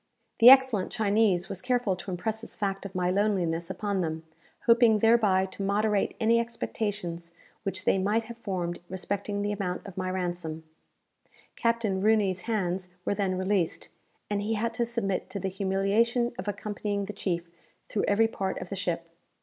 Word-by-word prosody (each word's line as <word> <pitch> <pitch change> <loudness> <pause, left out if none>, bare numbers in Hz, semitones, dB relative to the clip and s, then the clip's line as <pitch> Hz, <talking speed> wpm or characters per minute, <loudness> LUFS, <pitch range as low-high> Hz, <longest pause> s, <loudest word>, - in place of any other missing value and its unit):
The 235 +1 +10
excellent 260 -7 +6
Chinese 205 -5 +2
was 195 - -5
careful 245 -6 +1
to 180 - -8
impress 215 +5 -3
this 225 - -8
fact 195 -1 -2
of 190 - -17
my 180 0 +1
loneliness 185 -4 0
upon 195 0 -1
them, 160 -1 -3 0.4
hoping 230 -2 +6
thereby 210 -4 +4
to 190 +1 -8
moderate 205 +1 +1
any 230 +1 +4
expectations 205 -7 -4 0.3
which 195 -3 -3
they 195 - +3
might 210 +4 +1
have 235 +1 -10
formed 180 -5 -3
respecting 200 +2 -3
the 205 - 0
amount 195 -3 -3
of 195 -3 -10
my 185 0 -1
ransom. 175 -3 -3 0.9
Captain 230 -5 0
Rooney's 205 -3 +2
hands 185 -4 -1 0.2
were - - +1
then 195 -2 -1
released, 185 -2 0 0.4
and 205 -1 -1
he 220 +2 -1
had 230 +2 -1
to 235 +1 0
submit 230 -5 -2
to 200 - -4
the 190 - -2
humiliation 200 +6 +1
of - - -5
accompanying 205 0 -3
the 210 - -6
chief 170 -4 -3 0.4
through 205 - -1
every 215 +2 +4
part 195 -4 -3
of 180 - -7
the 195 - -4
ship. 170 -3 -2
200 Hz, 170 wpm, -28 LUFS, 185-220 Hz, 0.9 s, The